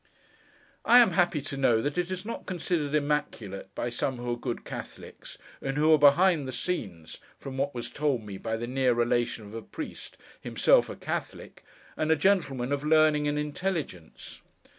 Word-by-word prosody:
I 240 - +6
am 240 -5 +7
happy 175 -4 +2
to 135 0 -6
know 120 -4 +3
that 145 +5 -2
it 180 0 -1
is 185 +1 -5
not 230 - -6
considered 170 -5 -1
immaculate, 145 -10 -2
by 120 - -2
some 125 +2 -2
who 120 0 -4
are - - 0
good 120 0 -5
Catholics, - - -9 0.2
and 135 +1 -3
who 155 +2 +5
are 155 - +5
behind 150 +1 +5
the - - -4
scenes, 95 - -5 0.2
from 135 -1 -8
what 140 0 -2
was 120 0 -5
told 140 -4 -1
me 100 -2 -8
by 110 -1 -3
the 115 - -4
near 130 0 +1
relation 120 -2 0
of 105 - -12
a 115 - -5
Priest, 310 - -8 0.2
himself - - +3
a - - -6
Catholic, - - -6 0.3
and 155 - -1
a 160 - +5
gentleman 145 -7 +1
of 145 0 -1
learning 155 -1 +4
and 145 0 0
intelligence. 150 - -5
145 Hz, 185 wpm, -28 LUFS, 120-160 Hz, 0.3 s, am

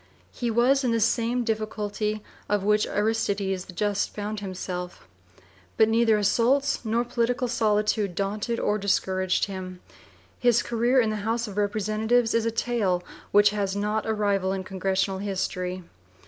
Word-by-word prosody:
He 240 - -3
was 250 +4 +3
in 250 - +1
the 230 - +1
same 235 +2 +1
difficulty 215 -1 -2 0.3
in 205 -1 +1
which 210 0 +3
Aristides 200 -3 -1
the 185 - -11
Just 205 +2 -1
found 210 +1 -4
himself. 180 -2 -6 0.7
But 220 0 +5
neither 225 0 +3
(p. - - +5
viii) 210 - 0
assaults 255 +8 +2
nor 230 +2 0
political 245 +1 0
solitude 210 -4 +1
daunted 210 +4 -2
or 210 +1 0
discouraged 185 -2 +1
him. 185 -2 -7 0.6
His 240 -2 +3
career 240 +3 +2
in 225 -3 +2
the 215 - -2
House 225 +3 -1
of 200 - -8
Representatives 215 +3 +1
is 230 0 +1
a - - +3
tale 220 -6 0 0.3
which 205 0 +5
has 200 -2 -2
not 210 +2 -1
a 220 - +1
rival 200 -2 +1
in 190 -1 -3
congressional 190 0 -1
history. 185 -2 -3
210 Hz, 160 wpm, -26 LUFS, 195-230 Hz, 0.7 s, But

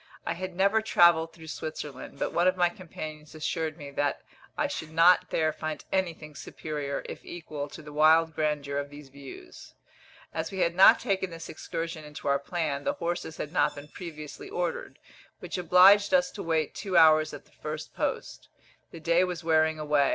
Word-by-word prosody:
I - - -1
had 185 +1 -6
never 200 +4 +3
travelled 170 -6 +4
through 160 -1 -12
Switzerland, 150 -4 -7
but - - -2
one 175 +1 +3
of 185 0 +2
my 175 -1 +4
companions 155 -4 -9
assured 160 0 -2
me 145 -3 -9
that 145 0 -1 0.3
I - - +1
should 160 - -4
not 165 +3 +5
there 155 -1 +1
find 155 -1 -5
anything 170 -5 -2
superior, 145 0 -5
if - - -8
equal, 150 -4 -6
to 155 - -11
the 150 0 -10
wild 160 +2 +5
grandeur 150 -2 -1
of 145 0 -5
these 145 -1 -12
views. 140 0 -12 0.6
As 160 0 -3
we 190 -1 -3
had 170 - +2
not 185 +2 +7
taken 195 -5 -1
this 165 -1 -9
excursion 165 0 -5
into 150 -1 -8
our 140 0 +3
plan, 145 -2 -3
the - - 0
horses 170 -2 -4
had 150 - -5
not - - +2
been 145 +1 -10
previously 155 -4 -9
ordered, 175 0 -3 0.4
which - - -5
obliged 190 - +6
us 270 0 +2
to 205 - -7
wait 160 -2 0
two 190 -4 -1
hours 155 -1 +6
at - - -10
the - - -26
first 155 0 -7
post. - - -4 0.4
The 165 - -10
day 170 +2 +3
was 180 -2 -3
wearing 160 -1 +3
away. 150 -2 +2
160 Hz, 190 wpm, -28 LUFS, 150-175 Hz, 0.6 s, not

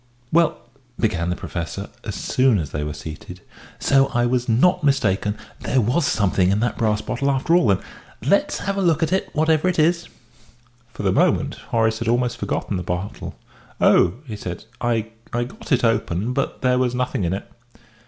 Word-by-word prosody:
"Well," 165 0 +3 0.4
began 90 -6 0
the 90 - 0
Professor, 90 +4 -5
as 105 -5 -5
soon 130 +4 +2
as 80 -6 -3
they 75 - -2
were 75 - -3
seated, 75 +1 -9 0.4
"so 135 0 +3
I 120 0 +1
was 125 0 0
not 155 +11 +3
mistaken 105 -7 +1 0.2
there 130 - +1
was 125 +7 +2
something 95 -3 +2
in 100 +2 +2
the 120 +2 0
brass 110 -2 +1
bottle 130 +6 -1
after 140 +5 +1
all, 175 -8 +5
then? 95 -2 +2 0.4
Let's 200 - +2
have 195 0 -3
a - - +1
look 165 -3 +2
at 165 - 0
it, 190 - 0
whatever 155 +2 +2
it 180 - 0
is." 170 +2 +2 0.8
For 105 - -7
the 95 - +2
moment - - +2
Horace 110 -1 +1
had 115 - -3
almost 120 0 +1
forgotten 100 - -2
the - - -3
bottle. 90 +3 -4 0.4
"Oh!" 85 - +4
he 110 -5 -6
said, 90 -4 -6 0.2
"I 115 -2 0 0.2
I 120 0 +1
got 215 - -10
it 125 -3 +3
open; 110 -1 0
but 140 +1 -2
there 125 0 +3
was 125 -1 +1
nothing 125 -5 -1
in 85 +1 0
it." 95 - -5
120 Hz, 190 wpm, -22 LUFS, 100-140 Hz, 0.8 s, all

